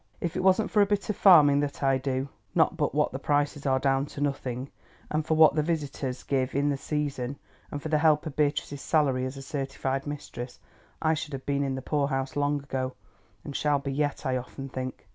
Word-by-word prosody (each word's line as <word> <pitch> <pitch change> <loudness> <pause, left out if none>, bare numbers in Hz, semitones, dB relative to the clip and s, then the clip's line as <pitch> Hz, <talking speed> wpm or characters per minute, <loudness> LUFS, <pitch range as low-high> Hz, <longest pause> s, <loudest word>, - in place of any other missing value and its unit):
If 170 0 -3
it 185 - 0
wasn't 190 +3 +3
for 210 - +4
a 200 - +4
bit 200 -1 0
of - - -5
farming 150 -8 +7
that 145 0 -3
I 135 -1 +3
do, 130 0 -2 0.3
not - - +3
but - - -1
what - - +2
the - - -5
prices 145 0 0
are 130 0 +3
down 135 +1 +1
to 145 - -9
nothing, 135 -2 -2 0.4
and 155 +1 +1
for 160 +1 0
what 155 -2 +7
the 155 - +2
visitors 145 -5 -3
give 130 -1 -1
in 140 +1 +2
the 140 - +1
season, 140 -3 -3 0.3
and 145 - -4
for 155 - -3
the 155 -1 +3
help 155 0 +4
of 155 -3 -5
Beatrice's 145 -1 0
salary 135 -5 +2
as 130 +1 -5
certificated 135 -1 -3
mistress, 130 -4 -6 0.5
I 160 0 +4
should 150 -1 -4
have 135 -1 -6
been 140 0 0
in 135 -1 -1
the 130 - -6
poor 145 -1 +1
house 135 -1 -2
long 145 0 0
ago, 130 -1 -3 0.5
and 140 - -7
shall 145 -1 +2
be 140 0 -4
yet, 145 0 -1
I 130 -1 +1
often 135 +2 -7
think. 130 -3 -6
140 Hz, 220 wpm, -27 LUFS, 135-150 Hz, 0.5 s, farming